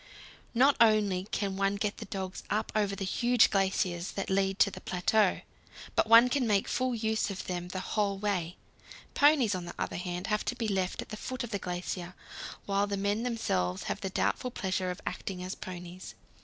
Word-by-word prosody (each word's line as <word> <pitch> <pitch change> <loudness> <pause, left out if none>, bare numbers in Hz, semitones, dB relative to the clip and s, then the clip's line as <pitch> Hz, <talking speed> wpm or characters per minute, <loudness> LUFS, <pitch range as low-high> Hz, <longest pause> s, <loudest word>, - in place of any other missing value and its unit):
Not 270 +4 +5
only 205 -4 +4
can 195 -2 -2
one 195 0 +1
get 205 +1 -2
the - - -7
dogs 190 -3 -5
up 215 +2 -1
over 205 -2 +1
the 195 - -3
huge 240 +3 +4
glaciers 190 -3 0
that 195 -1 -3
lead 195 0 +1
to 200 - +4
the - - -9
plateau, 185 +3 +2 0.5
but - - +3
one 230 +2 +8
can 250 -1 +1
make 205 -2 +2
full 255 -1 0
use 220 -1 0
of 195 -2 -5
them 175 -1 -3
the 185 +1 -4
whole 200 0 0
way. 190 -4 -2 0.6
Ponies, 285 -7 +5
on 180 -2 -3
the 175 - -8
other - - -3
hand, 180 0 -4
have 210 0 0
to 245 - -1
be 235 -2 -2
left 190 -3 -1
at - - -20
the 215 - -6
foot 255 +3 -4
of 240 - -6
the 200 - -1
glacier, 180 0 -4 0.5
while 200 0 +1
the 200 0 -2
men 200 +2 0
themselves 95 - -1
have - - -3
the 190 - -2
doubtful 250 +6 0
pleasure 190 -5 -2
of 180 +2 -5
acting 180 -2 -4
as 185 +1 -4
ponies. 180 0 -8
195 Hz, 200 wpm, -30 LUFS, 185-220 Hz, 0.6 s, one